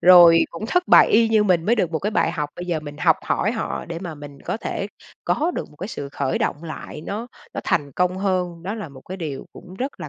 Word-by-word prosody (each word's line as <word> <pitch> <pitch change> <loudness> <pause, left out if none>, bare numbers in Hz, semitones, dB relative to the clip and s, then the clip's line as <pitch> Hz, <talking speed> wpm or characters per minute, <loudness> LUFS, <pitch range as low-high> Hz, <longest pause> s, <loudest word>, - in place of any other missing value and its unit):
rồi 175 -2 +8
cũng 170 +6 -6
thất 360 +8 +1
bại - - +8
y 225 +1 +5
như 220 -1 +4
mình 175 -4 +3
mới 235 - +5
được 180 -7 +1
một 160 - -1
cái 210 +5 -1
bài - - +2
học. 150 -1 -2
Bây 175 - -6
giờ 170 -3 -1
mình 145 -1 -8
học 145 - +4
hỏi - - 0
họ - - -3
để 170 0 -5
mà 170 -3 -6
mình 145 -1 -11
có - - -1
thể - - -3 0.4
có 320 +4 +1
được - - -4
một 150 - -19
cái 190 - -5
sự 140 -10 -5
khởi 140 -1 -1
động 150 +4 -1
lại, 155 -1 -7
nó 215 +4 -4 0.3
nó - - -2
thành 145 -3 0
công 180 +5 +1
hơn. 180 -3 -1
Đó 200 +4 -3
là 210 -7 -6
một 135 -2 -13
cái 185 +7 -7
điều 150 -7 -5
cũng 185 0 -12
rất 260 +7 -4
là - - -5
175 Hz, 270 wpm, -22 LUFS, 150-205 Hz, 0.4 s, rồi